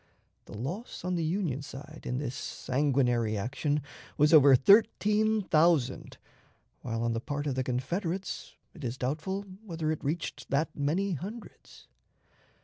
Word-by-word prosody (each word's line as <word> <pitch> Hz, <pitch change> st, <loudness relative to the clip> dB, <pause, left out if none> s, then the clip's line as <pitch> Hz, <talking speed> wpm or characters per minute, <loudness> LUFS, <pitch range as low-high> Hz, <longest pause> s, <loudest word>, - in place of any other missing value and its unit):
The 105 Hz, -, -9 dB
loss 175 Hz, -, -5 dB
on 180 Hz, -, 0 dB
the 170 Hz, -2 st, 0 dB
Union 160 Hz, -5 st, -1 dB
side 145 Hz, +3 st, -10 dB
in 125 Hz, -, -1 dB
this 135 Hz, -2 st, -3 dB
sanguinary 125 Hz, -6 st, 0 dB
action 140 Hz, +7 st, -1 dB, 0.3 s
was 150 Hz, +2 st, +4 dB
over 140 Hz, -3 st, +9 dB
thirteen 210 Hz, -, +4 dB
thousand, 155 Hz, -6 st, +2 dB, 0.6 s
while 115 Hz, -1 st, -3 dB
on 115 Hz, 0 st, +1 dB
the 115 Hz, -, -2 dB
part 145 Hz, +3 st, -3 dB
of 140 Hz, -, 0 dB
the 130 Hz, 0 st, -1 dB
Confederates 165 Hz, +10 st, -3 dB, 0.2 s
it 160 Hz, -, -12 dB
is 125 Hz, 0 st, -3 dB
doubtful 160 Hz, +10 st, -2 dB, 0.2 s
whether 165 Hz, -6 st, -2 dB
it 155 Hz, -, -4 dB
reached 155 Hz, +4 st, -3 dB
that 145 Hz, +3 st, 0 dB
many 165 Hz, +8 st, 0 dB
hundreds.' 205 Hz, -, -9 dB
150 Hz, 145 wpm, -29 LUFS, 130-175 Hz, 0.6 s, over